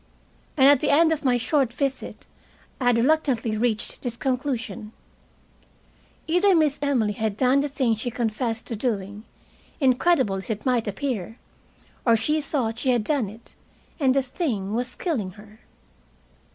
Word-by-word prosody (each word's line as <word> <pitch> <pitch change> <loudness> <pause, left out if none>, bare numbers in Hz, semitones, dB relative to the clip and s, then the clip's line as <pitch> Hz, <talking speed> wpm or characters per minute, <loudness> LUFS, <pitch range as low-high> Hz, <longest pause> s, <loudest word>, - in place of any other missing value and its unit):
And, 265 - +6
at 285 -1 +6
the - - 0
end 320 +3 +5
of 315 -2 -1
my 250 -3 +3
short 260 +1 +1
visit, 275 +2 -4 0.5
I 255 - -2
had 245 -1 +4
reluctantly 250 -4 +1
reached 220 0 -1
this 240 -2 -4
conclusion: 250 -4 -3 1.3
either 360 +4 +3
Miss 305 -3 +2
Emily 255 -7 +1
had 215 0 -2
done 260 +2 +3
the 285 - 0
thing 260 -5 0
she 220 +3 -4
confessed 225 -1 -2
to 230 - -4
doing, 205 -2 -3 0.5
incredible 260 - +2
as 190 - -8
it 215 -1 -4
might 245 -4 +1
appear, 225 -1 -3 0.7
or 230 -2 +4
she 300 +8 0
thought 240 -6 -2
she 260 - -1
had 240 -3 +2
done 255 -4 0
it; 220 +3 -14 0.5
and 265 -3 +3
the 275 - +2
thing 240 - -3
was 245 +2 -2
killing 225 - -2
her. 210 +2 -16
245 Hz, 155 wpm, -24 LUFS, 220-280 Hz, 1.3 s, And